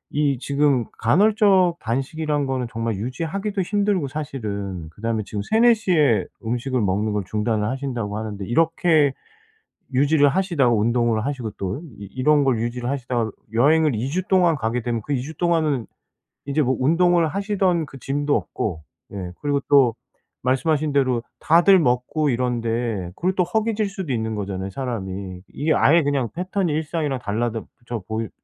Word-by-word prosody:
이 145 Hz, -3 st, +2 dB
지금 140 Hz, -2 st, +1 dB
간헐적 190 Hz, -, +4 dB
단식이란 145 Hz, +5 st, -1 dB
거는 130 Hz, -2 st, -2 dB
정말 115 Hz, -2 st, -2 dB
유지하기도 170 Hz, -, -3 dB
힘들고 200 Hz, -5 st, 0 dB
사실은 100 Hz, -, -5 dB
그다음에 110 Hz, +3 st, -2 dB
지금 105 Hz, 0 st, -4 dB
3-4 230 Hz, -, +4 dB
시에 160 Hz, -, +2 dB, 0.2 s
음식을 125 Hz, +2 st, -1 dB
먹는 105 Hz, +2 st, 0 dB
걸 105 Hz, -1 st, -1 dB
중단을 105 Hz, +1 st, -1 dB
하신다고 120 Hz, -5 st, -3 dB
하는데 105 Hz, -3 st, -5 dB
이렇게 160 Hz, -, +3 dB, 1.0 s
유지를 145 Hz, -2 st, +6 dB
하시다가 155 Hz, -6 st, +2 dB
운동을 115 Hz, 0 st, +1 dB
하시고 130 Hz, -6 st, -3 dB
또 95 Hz, +8 st, -3 dB, 0.2 s
이 100 Hz, -, -8 dB
이런 145 Hz, +3 st, +3 dB
걸 125 Hz, -5 st, +1 dB
유지를 120 Hz, +1 st, -3 dB
하시다가 120 Hz, -4 st, -1 dB, 0.3 s
여행을 150 Hz, +1 st, +4 dB
2 125 Hz, +5 st, -2 dB
주 180 Hz, +6 st, -1 dB
동안 180 Hz, -4 st, +4 dB
가게 115 Hz, -1 st, -2 dB
되면 115 Hz, -2 st, -2 dB
그 145 Hz, -, -2 dB
2 125 Hz, -, 0 dB
주 155 Hz, +4 st, -8 dB
동안은 155 Hz, -8 st, +1 dB, 0.6 s
인제 145 Hz, +2 st, 0 dB
뭐 130 Hz, -1 st, +1 dB
운동을 170 Hz, +4 st, +3 dB
하시던 190 Hz, -3 st, 0 dB
그 135 Hz, -, -12 dB
gym도 145 Hz, +2 st, -1 dB
없고 80 Hz, -7 st, -4 dB, 0.3 s
예 90 Hz, -3 st, -6 dB
그리고 145 Hz, -1 st, +1 dB
또 130 Hz, -5 st, +5 dB, 0.5 s
말씀하신 145 Hz, +3 st, +1 dB
대로 130 Hz, -4 st, +1 dB, 0.2 s
다들 175 Hz, +4 st, +5 dB
먹고 140 Hz, +2 st, +1 dB
이런데 115 Hz, -6 st, -1 dB
그리고 185 Hz, +2 st, 0 dB
또 180 Hz, -, +3 dB
허기질 215 Hz, +2 st, 0 dB
수도 190 Hz, -8 st, -4 dB
있는 110 Hz, -1 st, -2 dB
거잖아요 95 Hz, -1 st, -4 dB
사람이. 95 Hz, -6 st, -5 dB
이게 155 Hz, +2 st, +1 dB
아예 165 Hz, +3 st, +4 dB
그냥 140 Hz, -4 st, 0 dB
패턴이 185 Hz, 0 st, -1 dB
일상이랑 150 Hz, -3 st, -2 dB
달라다져보이 115 Hz, 0 st, -4 dB
135 Hz, 345 characters per minute, -22 LUFS, 115-160 Hz, 1.0 s, 유지를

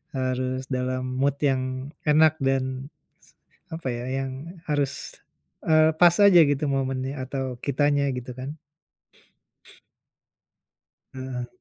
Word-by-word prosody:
harus 130 Hz, 0 st, -1 dB
dalam 130 Hz, 0 st, -1 dB, 0.2 s
mood 140 Hz, +1 st, +2 dB
yang 130 Hz, 0 st, -1 dB, 0.2 s
enak 155 Hz, +1 st, +5 dB
dan 135 Hz, 0 st, -1 dB, 0.3 s
se -, -, -26 dB, 0.4 s
apa 165 Hz, -4 st, -6 dB
ya, 120 Hz, 0 st, -4 dB, 0.2 s
yang 135 Hz, -, -4 dB, 0.4 s
harus, 145 Hz, -2 st, -2 dB, 0.5 s
eee, 155 Hz, 0 st, +5 dB
pas 175 Hz, -1 st, +7 dB
aja 195 Hz, -3 st, +8 dB
gitu 145 Hz, 0 st, 0 dB
momennya 135 Hz, 0 st, -2 dB
atau 130 Hz, -2 st, -4 dB
kitanya 145 Hz, 0 st, +2 dB
gitu 125 Hz, 0 st, -6 dB
kan? 140 Hz, +4 st, -6 dB, 2.5 s
Heeh. 130 Hz, -2 st, -5 dB
135 Hz, 110 wpm, -25 LUFS, 130-145 Hz, 2.5 s, aja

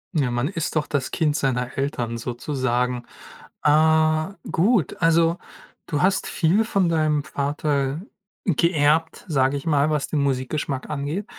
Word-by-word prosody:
Ja, 140 Hz, -5 st, +2 dB
man 120 Hz, +2 st, -1 dB
ist 165 Hz, -3 st, -3 dB
doch 155 Hz, -1 st, +1 dB
das 140 Hz, -3 st, -2 dB
Kind 150 Hz, -2 st, 0 dB
seiner 125 Hz, -3 st, -1 dB
Eltern 120 Hz, -4 st, -2 dB
sozusagen. 125 Hz, 0 st, -2 dB, 0.6 s
Äh, 155 Hz, +3 st, +3 dB, 0.2 s
gut, 195 Hz, -, +2 dB
also, 165 Hz, +1 st, +3 dB, 0.5 s
du 145 Hz, -2 st, -1 dB
hast 195 Hz, +1 st, +2 dB
viel 190 Hz, +6 st, +2 dB
von 195 Hz, -5 st, +1 dB
deinem 155 Hz, -3 st, +1 dB
Vater 145 Hz, -1 st, -1 dB, 0.5 s
geerbt, 160 Hz, -2 st, +1 dB
sage 135 Hz, -2 st, +1 dB
ich 140 Hz, -, -8 dB
mal, 150 Hz, -2 st, +2 dB
was 150 Hz, -2 st, 0 dB
den 150 Hz, -3 st, 0 dB
Musikgeschmack 135 Hz, 0 st, -2 dB
angeht. 150 Hz, +7 st, -3 dB
150 Hz, 135 wpm, -23 LUFS, 135-160 Hz, 0.6 s, Äh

